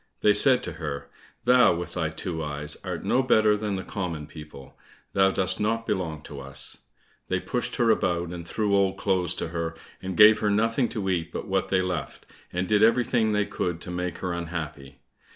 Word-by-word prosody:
They 105 Hz, -, +5 dB
said 125 Hz, +4 st, +5 dB
to -, -, -4 dB
her, 70 Hz, -3 st, -5 dB, 0.3 s
"Thou, 125 Hz, -6 st, +5 dB
with 85 Hz, 0 st, -5 dB
thy 80 Hz, -4 st, -1 dB
two 80 Hz, +1 st, -4 dB
eyes, 75 Hz, 0 st, -1 dB
art -, -, -4 dB
no 130 Hz, -, +2 dB
better 110 Hz, -5 st, +4 dB
than 105 Hz, -1 st, -2 dB
the 95 Hz, -, -4 dB
common 85 Hz, -6 st, -4 dB
people; 75 Hz, -3 st, -12 dB, 0.4 s
thou 95 Hz, 0 st, +4 dB
dost 95 Hz, -1 st, 0 dB
not 115 Hz, +2 st, 0 dB
belong 80 Hz, -7 st, -2 dB
to 70 Hz, -3 st, -9 dB
us!" 70 Hz, 0 st, -4 dB, 0.5 s
They 95 Hz, -, 0 dB
pushed 120 Hz, +7 st, -2 dB
her 115 Hz, -2 st, +3 dB
about, 85 Hz, -5 st, 0 dB
and 85 Hz, -1 st, -7 dB
threw 100 Hz, +4 st, 0 dB
old 95 Hz, -1 st, +2 dB
clothes 95 Hz, -3 st, +1 dB
to -, -, -3 dB
her, 85 Hz, -1 st, -3 dB, 0.3 s
and 95 Hz, -1 st, -5 dB
gave 105 Hz, +1 st, +8 dB
her 105 Hz, -, +1 dB
nothing 115 Hz, +4 st, +1 dB
to 105 Hz, -4 st, -4 dB
eat 85 Hz, -3 st, -1 dB
but -, -, -5 dB
what 95 Hz, -1 st, 0 dB
they 95 Hz, -1 st, +2 dB
left, 90 Hz, -3 st, -4 dB, 0.3 s
and 90 Hz, +1 st, -2 dB
did 105 Hz, -1 st, +3 dB
everything 115 Hz, 0 st, +3 dB
that -, -, +1 dB
they 105 Hz, -, +2 dB
could 90 Hz, -4 st, -3 dB
to 90 Hz, -, -7 dB
make 90 Hz, -1 st, -3 dB
her 90 Hz, -2 st, -3 dB
unhappy. 75 Hz, -6 st, -6 dB
90 Hz, 205 wpm, -26 LUFS, 80-105 Hz, 0.5 s, gave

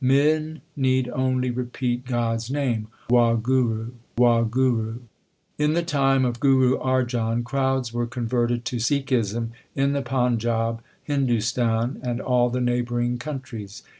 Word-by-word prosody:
Men 155 Hz, +4 st, +2 dB
need 130 Hz, -2 st, +1 dB
only 130 Hz, 0 st, 0 dB
repeat 125 Hz, 0 st, -3 dB
God 120 Hz, -2 st, 0 dB
s 115 Hz, +1 st, -6 dB
name, 130 Hz, -6 st, -1 dB, 0.2 s
Wahguru! 120 Hz, -1 st, +2 dB, 0.3 s
Wahguru! 120 Hz, -1 st, +2 dB, 0.6 s
In 150 Hz, +1 st, +2 dB
the 170 Hz, +1 st, +1 dB
time 135 Hz, -4 st, +2 dB
of 120 Hz, -1 st, -2 dB
Guru 130 Hz, -2 st, +4 dB
Arjan 120 Hz, -3 st, 0 dB
crowds 130 Hz, -1 st, -1 dB
were 120 Hz, 0 st, -1 dB
con 120 Hz, 0 st, -4 dB
verted 120 Hz, 0 st, 0 dB
to 125 Hz, -, -3 dB
Sikhism 120 Hz, -4 st, 0 dB, 0.3 s
in 140 Hz, +1 st, +2 dB
the 140 Hz, -, 0 dB
Panjab, 120 Hz, -3 st, 0 dB, 0.2 s
Hindustan, 120 Hz, -3 st, 0 dB
and 120 Hz, -1 st, -2 dB
a.ll 125 Hz, -2 st, +2 dB
the 125 Hz, +1 st, -2 dB
neighbouring 120 Hz, 0 st, 0 dB
countries. 120 Hz, -8 st, -7 dB
125 Hz, 130 wpm, -24 LUFS, 120-130 Hz, 0.6 s, Guru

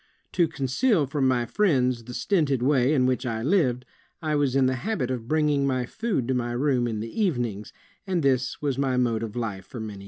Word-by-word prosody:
To 170 Hz, -2 st, +2 dB
conceal 155 Hz, -, +1 dB
from 135 Hz, 0 st, 0 dB
my 125 Hz, -2 st, +1 dB
friends 125 Hz, -, +1 dB
the 125 Hz, +1 st, -8 dB
stinted 145 Hz, -, +1 dB
way 135 Hz, -1 st, +3 dB
in 135 Hz, -4 st, +3 dB
which 130 Hz, 0 st, 0 dB
I 115 Hz, -3 st, -3 dB
lived, 130 Hz, -6 st, +1 dB, 0.3 s
I 155 Hz, -2 st, -2 dB
was 140 Hz, -3 st, +1 dB
in 135 Hz, -1 st, +4 dB
the 130 Hz, 0 st, +1 dB
habit 150 Hz, -, -2 dB
of 120 Hz, -3 st, -4 dB
bringing 150 Hz, -2 st, +2 dB
my 130 Hz, -2 st, 0 dB
food 205 Hz, -, -2 dB
to -, -, +2 dB
my 120 Hz, -1 st, -1 dB
room 125 Hz, -1 st, +1 dB
in 110 Hz, -2 st, -3 dB
the 115 Hz, -, -4 dB
evenings, 120 Hz, -, -1 dB, 0.4 s
and 180 Hz, -4 st, 0 dB
this 130 Hz, -2 st, +1 dB
was 140 Hz, -2 st, -1 dB
my 130 Hz, -2 st, +1 dB
mode 115 Hz, -3 st, +1 dB
of 110 Hz, -2 st, -5 dB
life 100 Hz, -6 st, -4 dB
for 120 Hz, -, -8 dB
many 110 Hz, -1 st, -5 dB
years." 100 Hz, -, -10 dB
130 Hz, 220 wpm, -25 LUFS, 120-150 Hz, 0.4 s, in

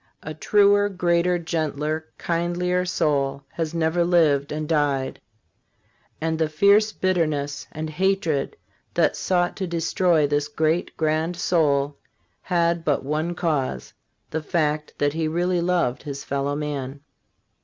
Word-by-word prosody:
A 155 Hz, -, -5 dB
truer, 205 Hz, +5 st, +4 dB
greater, 180 Hz, -1 st, +1 dB
gentler, 155 Hz, -2 st, -2 dB
kindlier 175 Hz, +1 st, 0 dB
soul 140 Hz, -5 st, 0 dB
has 165 Hz, 0 st, -4 dB
never 165 Hz, +1 st, +1 dB
lived 155 Hz, -5 st, +3 dB
and 155 Hz, 0 st, -3 dB
died; 145 Hz, -4 st, 0 dB, 1.0 s
and 160 Hz, 0 st, -1 dB
the 160 Hz, -1 st, +1 dB
fierce 200 Hz, +7 st, +4 dB
bitterness 155 Hz, -8 st, -1 dB
and 155 Hz, +1 st, -4 dB
hatred 165 Hz, -3 st, 0 dB, 0.4 s
that -, -, +3 dB
sought 175 Hz, -1 st, 0 dB
to 190 Hz, -3 st, -2 dB
destroy 170 Hz, -1 st, +2 dB
this 145 Hz, 0 st, 0 dB
great, 155 Hz, +3 st, -1 dB
grand 160 Hz, +2 st, 0 dB
soul 145 Hz, -5 st, +1 dB, 0.4 s
had 170 Hz, -2 st, +1 dB
but 145 Hz, -4 st, 0 dB
one 155 Hz, +4 st, -1 dB
cause 140 Hz, -, -2 dB, 0.2 s
— -, -, -48 dB
the 160 Hz, -, -2 dB
fact 150 Hz, -2 st, -1 dB
that 145 Hz, 0 st, +1 dB
he 160 Hz, 0 st, -1 dB
really 175 Hz, +2 st, 0 dB
loved 170 Hz, -8 st, 0 dB
his 140 Hz, -2 st, -6 dB
fellow 140 Hz, +1 st, -2 dB
man. 145 Hz, -2 st, -4 dB
160 Hz, 135 wpm, -23 LUFS, 145-175 Hz, 1.0 s, truer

